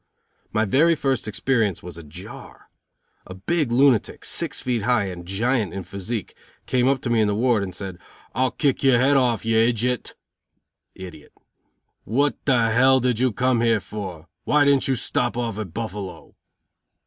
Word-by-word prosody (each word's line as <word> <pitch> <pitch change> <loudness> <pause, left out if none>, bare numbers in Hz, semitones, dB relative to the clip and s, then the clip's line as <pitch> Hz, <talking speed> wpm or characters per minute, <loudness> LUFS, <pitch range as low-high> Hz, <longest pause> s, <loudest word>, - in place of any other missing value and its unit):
My 110 0 +1
very 155 +11 +3
first 135 -7 -1
experience 110 -3 0
was 90 -2 -8
a 85 - -9
jar. 75 -2 -12 0.6
A 95 - -9
big 145 - -1
lunatic, 125 -3 +2
six - - -2
feet 125 -3 -1
high 120 0 +2
and 90 -3 -6
a - - -14
giant 110 +2 -1
in 95 - -4
physique, 100 +4 -5 0.3
came 125 -1 +1
up 135 -1 +1
to 120 - -3
me 115 -2 +3
in 105 - +2
the 105 - 0
ward, 120 -1 +2
and 95 -2 -5
said: 95 -3 -7 0.3
"I'll 130 +2 +1
kick 135 +3 0
your 135 -3 +4
head 135 +4 +3
off, 125 -5 +1
you 115 0 +2
ijit 120 +1 +1 0.8
(idiot). 90 -5 -11 0.7
What 140 +6 +1
the 130 0 +4
did 125 -2 0
you 130 0 +2
come 125 +1 +1
here 115 -2 +3
for? 95 -5 -8 0.2
Why 150 -1 +3
didn't 140 -1 +3
you 135 - +1
stop 120 +1 -1
off 115 -4 -3
at 100 -6 -5
Buffalo?" 105 -2 -6
115 Hz, 170 wpm, -23 LUFS, 100-130 Hz, 0.8 s, your